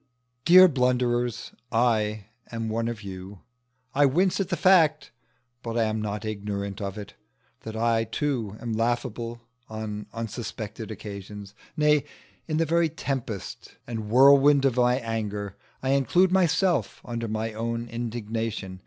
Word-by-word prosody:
Dear 185 +2 +9
blunderers, 125 -4 0 0.2
I 110 -3 +1 0.3
am 115 -1 -3
one 115 +1 -1
of 115 -2 -5
you. 95 0 -9 0.5
I 145 0 +5
wince 180 +9 +2
at 195 -2 -1
the 175 - -1
fact, 165 -4 +4 0.5
but 115 -1 -4
I 115 - +3
am 110 0 -1
not 105 0 -4
ignorant 100 -2 -4
of 100 0 -4
it, 105 -2 -8 0.5
that 110 0 -8
I 115 0 +1
too 115 -3 -2
am 115 -1 -4
laughable 120 0 -2 0.3
on 110 -1 -5
unsuspected 115 -1 -6
occasions; 100 -1 -8 0.2
nay, 150 -2 +4 0.4
in 155 -2 -1
the 165 - +2
very 165 +1 +2
tempest 130 - -5
and 110 -3 -5
whirlwind 140 +3 +6
of 130 -2 +2
my 125 0 +4
anger, 105 -3 -4 0.3
I 130 - 0
include 175 +7 +3
myself 180 -2 +2
under 115 -1 -4
my 110 +1 -3
own 115 +1 -3
indignation. 115 -4 -4
115 Hz, 140 wpm, -26 LUFS, 110-135 Hz, 0.5 s, Dear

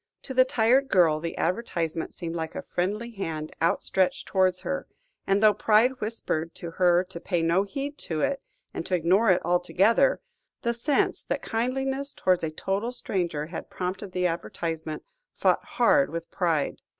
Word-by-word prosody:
To 265 - -6
the 255 0 +5
tired 255 +2 +3
girl 170 -8 +4
the 165 +1 -5
advertisement 170 -6 -2
seemed 165 -2 -6
like 160 -1 -4
a - - -4
friendly 210 +7 -2
hand 160 -7 -5
outstretched 180 +2 +1
towards 185 -1 +2
her; 275 - -3 0.4
and 195 +2 +2
though 215 -1 +7
pride 230 +6 +3
whispered 170 -7 -3
to 170 - -7
her 175 0 +3
to 185 -2 -9
pay 175 -1 -1
no 170 +3 +3
heed 275 +8 -5
to 155 -2 -1
it, 280 -1 0 0.3
and - - -4
to 185 - +1
ignore 185 +6 +3
it 180 -3 +3
altogether, 185 - +3 0.4
the 235 -1 +1
sense 255 +5 +1
that - - -2
kindliness 270 +4 -2
towards 185 -2 +2
a 160 - 0
total 195 +8 -2
stranger 175 -10 -2
had 165 +2 -7
prompted 185 +2 -4
the 180 0 -1
advertisement, 165 -2 -3 0.3
fought - - +2
hard 280 -2 +3
with 165 0 -6
pride. 165 -6 0
185 Hz, 165 wpm, -26 LUFS, 170-230 Hz, 0.4 s, though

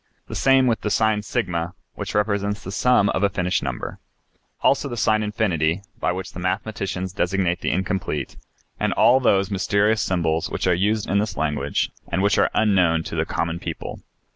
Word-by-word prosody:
The - - -9
same 135 -1 +4
with 115 -3 +1
the 105 - -1
sign 110 +1 +2
S, 105 +4 -6 0.6
which - - -6
represents 105 0 0
the 95 - -6
sum 105 -1 +3
of - - 0
a 100 - +3
finished 90 -1 0
number. 65 -3 -5 0.6
Also 140 +1 +2
the 120 - -5
sign 110 -1 +2
8, 95 -5 0 0.2
by 90 - +1
which 90 0 -5
the - - -7
mathematicians 95 0 -3
designate 90 -2 0
the - - 0
incomplete, 95 0 -2 0.4
and - - +1
all 130 +2 +5
those 100 -5 +2
mysterious 100 +2 +2
symbols 85 -3 0
which - - -3
are 90 - +4
used 105 +4 0
in 100 +2 +2
this 105 +1 -2
language 75 -2 -1 0.2
and 95 +3 -1
which 100 - +3
are - - +4
unknown 90 -6 +3
to - - -6
the - - 0
common 85 0 -2
people. - - -6
100 Hz, 185 wpm, -23 LUFS, 90-105 Hz, 0.6 s, all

